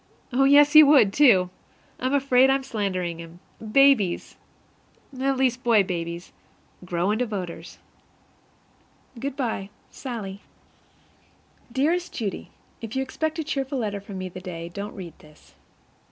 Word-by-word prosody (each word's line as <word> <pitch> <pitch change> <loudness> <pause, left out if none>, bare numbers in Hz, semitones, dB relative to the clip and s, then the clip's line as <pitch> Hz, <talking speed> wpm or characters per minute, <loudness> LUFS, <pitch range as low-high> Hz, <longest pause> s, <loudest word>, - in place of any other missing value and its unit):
Oh, 270 +2 +3
yes, 290 +1 +6
he 310 - +11
would, 280 -9 +5
too! 200 -11 +5 0.5
I'm 260 +3 0
afraid 265 -1 +4
I'm 270 0 +1
slandering 185 -8 -3
him. 165 +1 -11 0.2
Babies 220 -5 +3 0.8
at 270 0 0
least 255 -1 0
boy 225 -4 +4
babies 170 -1 -5 0.5
grow 180 +2 -1
into 240 +3 0
voters. 180 -5 -6 1.4
Good 275 +2 -4
by, 225 -7 -3 0.2
SALLIE. 210 -7 -7 1.3
Dearest 325 +8 0
Judy: 210 -5 -5 0.3
If 225 +1 -7
you 265 - 0
expect 315 +4 -3
a 320 - -2
cheerful 275 -2 -3
letter 205 -4 -3
from 200 -1 -9
me 185 0 -4
the 185 0 -9
day, 170 -2 -7
don't 200 +4 -7
read 175 -5 -8
this. 150 0 -20
220 Hz, 135 wpm, -24 LUFS, 185-270 Hz, 1.4 s, he